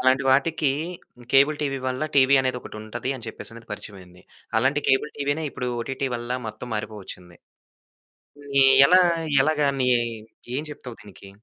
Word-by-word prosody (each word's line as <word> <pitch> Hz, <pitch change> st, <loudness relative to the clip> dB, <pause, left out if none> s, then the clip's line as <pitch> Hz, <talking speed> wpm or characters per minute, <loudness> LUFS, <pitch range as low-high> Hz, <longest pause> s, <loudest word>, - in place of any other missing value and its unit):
అలాంటి 130 Hz, +1 st, +3 dB
వాటికి 145 Hz, +1 st, +2 dB, 0.6 s
cable 140 Hz, +3 st, +5 dB
TV 135 Hz, -2 st, -1 dB
వల్ల 130 Hz, +2 st, -3 dB
టీవీ 135 Hz, 0 st, +6 dB
అనేది 130 Hz, -1 st, -1 dB
ఒకటి -, -, -10 dB
ఉంటది 120 Hz, +4 st, -4 dB
అని 120 Hz, -, -10 dB
చెప్పేసి 110 Hz, -, -6 dB
అనేది 115 Hz, -1 st, -13 dB
పరిచయం 105 Hz, -1 st, -8 dB
అయింది. 90 Hz, 0 st, -17 dB, 0.4 s
అలాంటి 140 Hz, +5 st, +1 dB
కేబుల్ 135 Hz, +2 st, +2 dB
టీవీనే 145 Hz, +3 st, -1 dB
ఇప్పుడు 125 Hz, -1 st, -5 dB
ఓటిటి 135 Hz, +3 st, -3 dB
వల్ల 120 Hz, +1 st, -8 dB, 0.2 s
మొత్తం 110 Hz, +3 st, -8 dB
మారిపోవచ్చింది. 100 Hz, -5 st, -7 dB, 1.1 s
ఇది 140 Hz, -1 st, +3 dB, 0.2 s
ఎలా? 185 Hz, +1 st, +6 dB, 0.4 s
ఎలాగా 150 Hz, -1 st, +2 dB
నీ 125 Hz, -, +2 dB, 0.7 s
ఏం 150 Hz, -, -2 dB
చెప్తావు 125 Hz, -5 st, -10 dB
దీనికి? 100 Hz, -1 st, -13 dB
130 Hz, 150 wpm, -24 LUFS, 110-140 Hz, 1.1 s, టీవీ